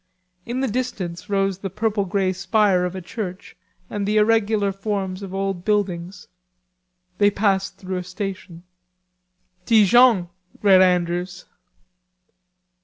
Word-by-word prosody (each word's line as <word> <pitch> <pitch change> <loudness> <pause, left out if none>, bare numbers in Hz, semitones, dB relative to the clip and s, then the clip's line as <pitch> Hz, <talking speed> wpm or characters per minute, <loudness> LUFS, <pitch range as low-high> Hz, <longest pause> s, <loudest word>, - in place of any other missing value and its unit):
In 245 +2 -2
the 270 - +1
distance 210 -7 -4
rose 195 -2 0
the 195 - -4
purple 210 +1 -1
grey 190 0 0
spire 190 0 +2
of 180 +1 -4
a 185 - -6
church 185 -1 -7 0.3
and 205 -1 -3
the 210 +1 +1
irregular 210 -2 +2
forms 195 -1 -3
of 195 -2 -7
old 195 -2 -3
buildings. 190 -3 -2 0.9
They 205 0 +5
passed 195 -1 0
through 185 -1 -5
a 180 - -4
station. 185 -2 -7 1.0
"Dijon," 220 -3 +5 0.3
read 190 -2 +6
Andrews. 180 0 0
195 Hz, 120 wpm, -22 LUFS, 185-210 Hz, 1.0 s, read